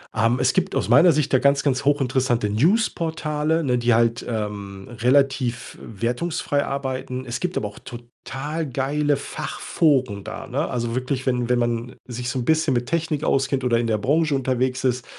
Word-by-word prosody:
Ähm, 115 +2 +2
es - - +2
gibt 190 +1 0
aus - - -1
meiner 175 0 +7
Sicht 150 -3 0
ja 130 - +5
ganz, 140 +1 +3
ganz 130 -3 0
hochinteressante 130 -5 +1
News 170 - +3
Portale, 160 -1 -1
ne, 125 -4 +1
die 120 0 +2
halt, 115 0 +2
ähm, 100 -3 -5
relativ 130 -1 +1
wertungsfrei 140 - -2
arbeiten. 130 -2 -4
Es 120 -1 -4
gibt 180 0 -2
aber 105 - -1
auch 100 - -12
total 135 +6 -6
geile 145 +3 0
Fachforen 135 - -1
da, - - -7
ne? - - -1
Also 120 -1 -2
wirklich, 130 +1 -2
wenn 125 -2 0
wenn 125 0 +3
man 120 0 -2
sich 125 0 -4
so 130 - -2
'n 120 - -3
bisschen 160 -2 +2
mit 120 0 -1
Technik 160 -3 -1
auskennt 135 -1 +1
oder 120 -2 +2
in 120 - -1
der 110 -1 +1
Branche 150 +6 +1
unterwegs 130 -1 -1
ist, 125 -1 0
130 Hz, 180 wpm, -23 LUFS, 120-145 Hz, -, meiner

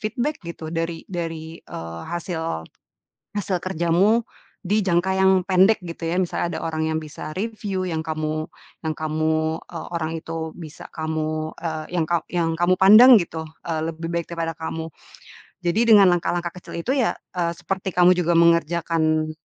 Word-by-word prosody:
feedback 245 +7 -2
gitu 165 -1 -7
dari 165 0 -3
dari, 165 -2 -5
eee, 80 0 -7
hasil 165 - -3 0.7
hasil 195 -2 -1
kerjamu 185 +6 +2 0.4
di 205 +3 +1
jangka 185 +1 +2
yang 190 0 +5
pendek 190 +2 +4
gitu 170 -1 -6
ya, 170 - 0
misalnya 175 -1 -2
ada - - -7
orang 160 -1 -1
yang 160 - 0
bisa 155 0 -8
reviu 205 -2 -3
yang 165 -3 -2
kamu 155 0 -2 0.4
yang 155 - -1
kamu 155 +1 0
e 175 - -10 0.2
orang 160 -1 -2
itu 160 0 -5
bisa 160 -4 -10
kamu, 155 0 -2
eee, 160 -2 -4
yang 160 - +1
ka 170 -1 +1
yang 165 -2 0
kamu 175 +1 +4
pandang 225 +6 +9
gitu, 165 -2 -4 0.2
eee, 160 -1 -1
lebih 165 +1 -6
baik 170 -1 -1
daripada 165 -1 -3
kamu. 160 0 -4 0.8
Jadi 175 +5 +2
dengan 205 -3 +8
langkah-langkah 175 0 -1
kecil - - -8
itu 245 +11 -1
ya, 250 -4 +3 0.3
eee, 170 -1 0
seperti 190 0 -3
kamu 180 0 +6
juga 170 -1 +2
mengerjakan, 165 -1 +2
170 Hz, 160 wpm, -23 LUFS, 160-180 Hz, 0.8 s, pandang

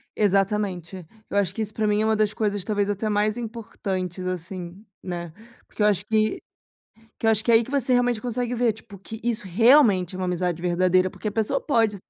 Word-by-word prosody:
Exatamente. 195 -3 0 0.2
Eu 200 - -1
acho 195 -4 +1
que 225 - -3
isso 215 0 -4
pra 215 -1 0
mim 210 +1 +2
é - - +1
uma 220 0 +2
das 215 -1 +1
coisas, 205 -3 -1
talvez, 205 -1 0
até 210 +2 -1
mais 210 +1 +1
importantes, 195 -6 -5
assim, 185 +2 -6 0.2
né. 175 -3 -6 0.3
Porque - - -7
eu 210 - +5
acho 205 -1 +1
que 215 0 +1 0.8
que 225 - -2
eu - - +6
acho 220 0 +1
que 235 - +1
é - - +6
aí 225 0 +5
que 260 - -11
você 270 -3 +1
realmente 245 -2 +2
consegue 245 0 -2
ver, 235 -2 +2
tipo, 205 -2 -14
que 220 +3 -9
isso 235 -4 -1
realmente 205 - +4
é - - -6
uma 185 - -2
amizade 180 -1 -1
verdadeira, 185 +1 +2
porque 215 - -5
a - - -5
pessoa 220 0 0
pode 225 -7 +2
210 Hz, 220 wpm, -24 LUFS, 185-225 Hz, 0.8 s, eu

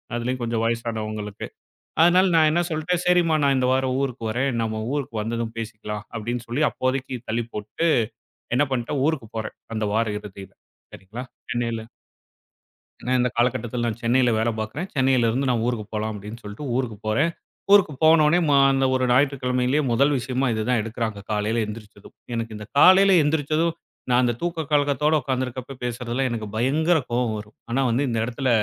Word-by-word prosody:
அதுலயும் 125 +2 -2
கொஞ்சம் 115 -1 -1
வயசானவங்களுக்கு. 110 -3 -3 0.6
அதனால 180 +2 +5
நான் 155 -1 +5
என்ன 170 - +2
சொல்ட்டேன். 165 +3 -1
சரிம்மா 175 -2 +4
நான் 140 -1 +3
இந்த 130 - +1
வாரம் 130 0 +1
ஊருக்கு 125 -3 -3
வரேன். 130 +5 0
நம்ம 110 -1 -2
ஊருக்கு 135 -5 -3
வந்ததும் 115 +1 -3
பேசிக்கலாம் 105 -1 -6
அப்டின்னு 120 +2 -4
சொல்லி 135 +6 +1
அப்போதைக்கு 130 0 -2
தள்ளிப் 115 +1 -2
போட்டுட்டு 105 +11 -2 0.7
என்ன 145 - +4
பண்ட்டேன், 130 +2 -1
ஊருக்குப் 135 -9 -2
போறேன், 110 - -4 0.2
அந்த 110 -1 -1
வார 115 +1 +2
இறுதியில 100 -2 -11 0.4
சரிங்களா. 110 +7 -8 0.3
சென்னைல 115 -2 -2 1.2
ஏன்னா, 125 - 0
இந்த 125 0 +2
காலகட்டத்துல 120 -1 0
நான் 110 -2 -3
சென்னைல 125 +2 +3
வேல 110 +1 +1
பாக்குறேன். 120 - -4
சென்னைல 130 -3 +3
இருந்து 135 +4 0
நான் 120 -3 +1
ஊருக்குப் 110 -4 -3
போலாம் 110 0 -2
அப்டின்னு 105 +3 -8
சொல்ட்டு 105 +8 -7
ஊருக்குப் 115 -5 -3
போறேன். 140 +10 +2 0.4
ஊருக்குப் 180 -9 +4
போனவுடனே 160 +1 +5
மா 140 - +5
அந்த 135 0 +2
ஒரு 130 - 0
ஞாயிற்றுக்கிழமயிலயே 130 0 +2
முதல் 140 +5 +3
விஷயமா 130 +1 -1
இது 110 0 -1
தான் 125 -2 +3
எடுக்குறாங்க, 110 -1 -4
காலைல 105 +2 0
எந்திரிச்சதும். 105 -1 -10 0.2
எனக்கு 115 -1 -3
இந்த 105 - -8
காலைல 190 +5 +7
எந்திரிச்சதும் 155 +2 +1 0.4
நான் 125 0 +4
அந்தத் 120 -2 0
தூக்கலக்கத்தோட 150 -3 +1
உக்காந்துருக்கப்ப 130 0 -3
பேசுறதுலா 125 +2 -2
எனக்குப் 110 -3 -5
பயங்கர 155 +9 +2
கோவம் 120 -2 0
வரும். 105 0 -10
ஆனா 125 +3 +1 0.3
இந்த 115 -2 -1
இடத்துல 125 +2 -2
125 Hz, 160 wpm, -23 LUFS, 110-140 Hz, 1.2 s, காலைல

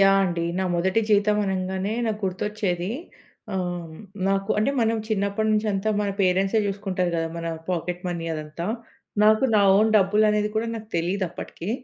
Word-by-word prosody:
Yeah! 195 0 +6
అండి. 170 -2 -1
నా 190 - +1
మొదటి 190 +5 +2
జీతం 210 0 +4
అనంగానే 190 +2 -2
నాకు 215 -1 -2
గుర్తొచ్చేది 190 0 -2 0.6
ఆహ్, 175 -3 -3 0.3
నాకు 195 +1 0
అంటే 215 +6 +2
మనం 225 0 +2
చిన్నప్పటి 200 +1 0
నుంచి 215 +1 +1
అంతా 195 +2 -1
మన 205 -1 0
పేరెంట్సే 190 +3 +3
చూసుకుంటారు 190 -3 -1
గదా! 165 -1 0
మన 165 0 -4 0.2
పాకెట్ 180 0 -2
మనీ 170 -1 -3
అదంతా. 155 +3 -5 0.6
నాకు 215 +4 +5
నా 205 - +5
ఓన్ 215 +1 +4
డబ్బులు 210 +2 +4
అనేది 210 0 +1
కూడా 225 +1 +1
నాకు 220 -1 -7
తెలీదప్పటికి. 180 +1 -3
195 Hz, 155 wpm, -24 LUFS, 180-210 Hz, 0.6 s, Yeah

